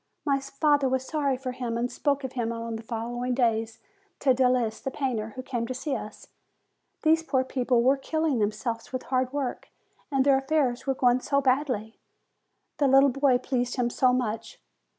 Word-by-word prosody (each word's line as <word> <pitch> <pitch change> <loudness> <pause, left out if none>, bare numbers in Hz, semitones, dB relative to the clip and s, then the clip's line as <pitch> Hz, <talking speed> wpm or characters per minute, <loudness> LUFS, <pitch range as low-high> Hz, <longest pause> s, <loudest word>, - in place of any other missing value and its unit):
My 280 -2 +2
father 275 0 +1
was 260 0 -1
sorry 280 -4 0
for 255 0 -4
him, 245 -2 -3
and 245 +1 -1
spoke 280 -1 0
of 260 - -4
him 235 -2 -1
on 230 0 -4
the 225 - -6
following 240 +2 -3
day 225 -3 +2 0.5
to 265 -2 +4
Delis 250 -3 +1
the - - -3
painter, 240 -6 -3
who 255 - -6
came 240 -3 -3
to 255 - -4
see 265 +2 -2
us. 210 0 -8 0.7
These 320 0 +4
poor 275 -5 0
people 250 -2 +1
were 265 +3 +4
killing 315 -1 -1
themselves 225 +2 -2
with 255 -1 -4
hard 255 -1 0
work, 275 -3 -3 0.4
and 270 -1 +2
their 275 -1 +5
affairs 270 -3 0
were 270 - +1
going 250 -1 +3
so 280 +2 +1
badly! 255 -5 0 0.8
The 285 - +4
little 270 +1 +6
boy 275 -1 +3
pleased 245 -1 -2
him 240 -2 0
so 255 +1 +3
much 230 -3 -2
255 Hz, 185 wpm, -27 LUFS, 240-275 Hz, 0.8 s, little